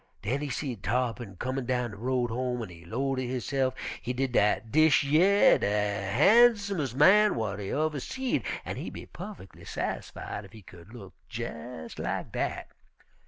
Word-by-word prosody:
Den 130 +7 -1
he 145 - -3
seed 125 -5 -4
Tarr'pin 115 -1 -2
comin' 130 +2 -3
down 125 -2 0
de 105 - -10
road 125 +1 -1
home, 125 0 -2
an' 105 - -7
he 85 -1 -13
'low 135 +9 -1
ter 130 - -2
hisse'f, 130 +1 -1 0.3
he 125 - -3
did, 130 +1 -1
dat 110 -1 +2
dish 155 -1 +5
yer 175 +8 +5
de - - 0 0.4
harnsumes' 200 - +4
man 205 +9 +6
w'at 105 -3 -3
he 100 - -5
uver 150 +4 0
seed, 265 - -2 0.2
an' - - -4
he - - -5
be - - -9
puffickly 185 - -10
sassified 105 - -5
ef 95 - -15
he 110 -2 -13
cu'd 90 +2 -14
look 100 -6 -11 0.2
jes' 120 -5 -7
lak - - -3
dat. - - -3
125 Hz, 170 wpm, -28 LUFS, 110-150 Hz, 0.4 s, man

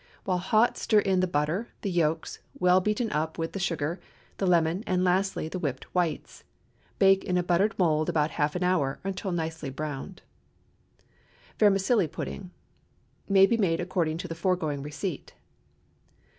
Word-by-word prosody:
While 180 -1 0
hot 215 +6 +2
stir 220 - +2
in 195 -2 +3
the 185 - +2
butter, 160 +8 -1
the 200 - -2
yolks, 160 -2 -1 0.2
well 180 +1 +4
beaten 210 +3 -1
up 155 +1 -2
with 165 -1 -3
the 195 - -4
sugar, 165 -2 -2 0.4
the 195 - 0
lemon, 170 +2 +2
and 185 -1 +1
lastly 185 -2 +1
the 180 +3 -5
whipped 145 -7 -3
whites. 175 -3 -2 0.5
Bake 195 -1 +5
in 180 -2 0
a 180 - +1
buttered 180 +5 +1
mould 155 -4 +2
about 150 -1 +1
half 150 +2 -1
an 180 - -1
hour, 175 -7 +1
or - - -5
until 195 0 -4
nicely 160 -3 -3
browned. 150 +6 -6 1.4
VERMICELLI 200 -1 +3
PUDDING 180 +4 -6 0.8
May 195 -1 +7
be 230 +3 +1
made 175 -6 +1
according 170 -3 -1
to 180 +2 -5
the 165 - -5
foregoing 165 -5 -1
receipt. 150 +3 -5
180 Hz, 160 wpm, -27 LUFS, 160-195 Hz, 1.4 s, May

